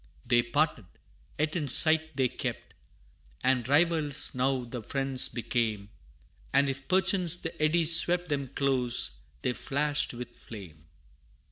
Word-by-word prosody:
They 120 0 +3
parted, 130 - -1 0.5
yet 155 +2 -1
in 155 -5 -2
sight 160 +2 +2
they 130 -1 +2
kept, - - -6 0.7
And 130 -2 +1
rivals 155 -1 +1
now 130 0 0
the 120 0 -7
friends 135 +2 -1
became, 110 -4 -3 0.6
And 140 +1 +3
if, 135 0 -5
perchance, 185 -2 +2
the 165 -2 -7
eddies 165 +1 +6
swept 175 +2 +3
Them 140 -2 -2
close, 125 - 0 0.2
they 125 - 0
flashed 145 +1 -2
with 125 0 -9
flame. 85 -8 -12
135 Hz, 130 wpm, -28 LUFS, 120-155 Hz, 0.7 s, eddies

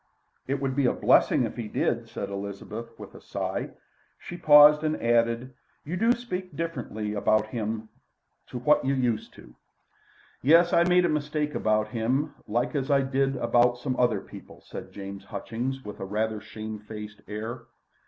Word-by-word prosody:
"It 140 +1 -1
would 135 -1 -2
be 140 -2 +3
a - - +2
blessing - - +4
if - - -4
he 115 -3 -4
did," 115 +2 -1
said 100 -2 -5
Elizabeth 100 +3 -6
with - - -11
a - - -13
sigh. - - -3 0.5
She 175 - -9
paused 150 -2 +7
and 155 0 0
added: 115 +2 +1 0.3
"You 160 +5 -3
do 230 +6 +3
speak 185 -7 -6
differently 120 -10 -4
about 110 +1 +2
him 110 -1 -3 0.6
to - - -6
what 150 +5 +3
you 135 +1 +1
used 120 -4 -1
to." - - -15 0.9
"Yes. 170 +5 +5
I 170 - +5
made 180 0 +4
a - - +3
mistake 150 -1 -1
about 110 0 +1
him 130 +7 -1
like 120 +3 0
as 140 -1 -2
I 140 -1 +4
did 135 0 0
about 120 -1 +3
some 130 +1 -2
other 120 -5 +2
people," - - -13
said - - -9
James 100 0 -8
Hutchings, 120 +6 -4
with 105 - -8
a - - -4
rather 110 +2 -2
shame 110 -1 -7
faced 105 -1 -9
air. 115 +3 -6
120 Hz, 175 wpm, -27 LUFS, 110-145 Hz, 0.9 s, paused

